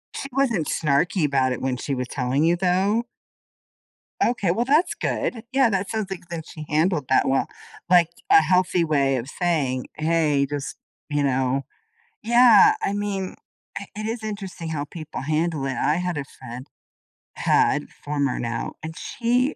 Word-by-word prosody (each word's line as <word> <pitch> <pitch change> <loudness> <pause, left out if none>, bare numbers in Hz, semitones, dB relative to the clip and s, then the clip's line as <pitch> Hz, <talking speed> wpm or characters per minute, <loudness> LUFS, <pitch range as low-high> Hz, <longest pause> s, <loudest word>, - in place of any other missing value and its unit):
She 275 - -5
wasn't 245 - +1
snarky 155 +3 +1
about 135 -3 +2
it - - -6
when 130 -1 -1
she 140 +2 -3
was 125 -1 -3
telling 130 +3 0
you, 170 +2 +4
though? 190 +6 +1 1.2
Okay, 205 -7 +1
well, 230 +7 0
that's 300 +7 +3
good. 225 -3 -2
Yeah, 265 -2 +4
that 195 -1 -1
sounds 215 -3 -2
like 180 -2 -7
that 165 -2 -5
she 155 -1 -9
handled 155 0 +1
that 130 - +3
well, 135 0 +1 0.4
like, 175 -2 +5 0.2
a 405 0 +8
healthy 180 -1 +2
way 140 -4 +2
of 120 +1 -5
saying, 145 -7 -1
"Hey. 155 -3 +2
Just" 145 0 -5 0.3
You 145 -1 0
know? 135 0 0 0.6
Yeah, 235 -1 +7
I 200 - -1
mean, 200 -2 -3 0.4
it 200 - -9
it 215 +1 -4
is 225 0 -4
interesting 195 -6 -5
how 145 -2 -3
people 155 +1 -7
handle 155 0 -1
it. 135 -1 -2
I 150 - +1
had 180 -1 -2
a 145 - -2
friend- 125 -1 -10 0.7
had, - - +2
former 145 -2 -1
now- 115 -1 -3
and 160 0 -6
she, 250 +4 0
165 Hz, 165 wpm, -23 LUFS, 140-200 Hz, 1.2 s, a